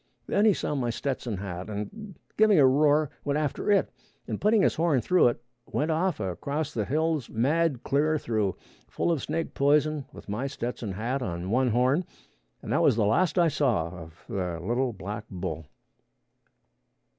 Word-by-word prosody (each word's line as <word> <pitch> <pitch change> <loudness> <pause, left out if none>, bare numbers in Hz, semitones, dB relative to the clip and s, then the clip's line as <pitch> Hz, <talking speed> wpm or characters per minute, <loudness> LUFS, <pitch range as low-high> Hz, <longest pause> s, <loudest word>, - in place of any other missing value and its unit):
Then 205 - +2
he 215 - +6
saw - - -2
my 130 -4 -1
Stetson 120 -3 -3
hat, 90 0 -6
and 190 - -6 0.2
giving 215 -3 +5
a 140 - +7
roar, 145 +2 +3
went 145 0 0
after 150 +5 -2
it, 200 - +3 0.4
and - - -4
putting 210 -1 +4
his - - +3
horn 160 -4 +2
through 180 +6 +4
it, 120 - 0 0.3
went 155 +2 -1
off 170 +1 0
across 140 - -3
the 110 -3 -1
hills 155 -1 0
mad 140 +3 +1
clear 155 +3 +2
through, 110 -8 -1 0.3
full - - -1
of 160 -5 0
snake 165 - -3
poison, 150 0 +2
with - - -13
my 105 +7 -2
Stetson 120 -6 -4
hat 120 +7 -2
on 90 -3 -4
one 130 +2 +3
horn, 130 +8 +2 0.6
and - - -5
that - - +3
was - - +4
the 110 -2 +2
last 175 - +2
I 175 -1 +5
saw 125 - +1
of 85 -1 -12
the 90 -6 -3
little 120 +8 0
black 105 +1 -6
bull. 80 -5 -5
130 Hz, 175 wpm, -27 LUFS, 105-155 Hz, 0.6 s, a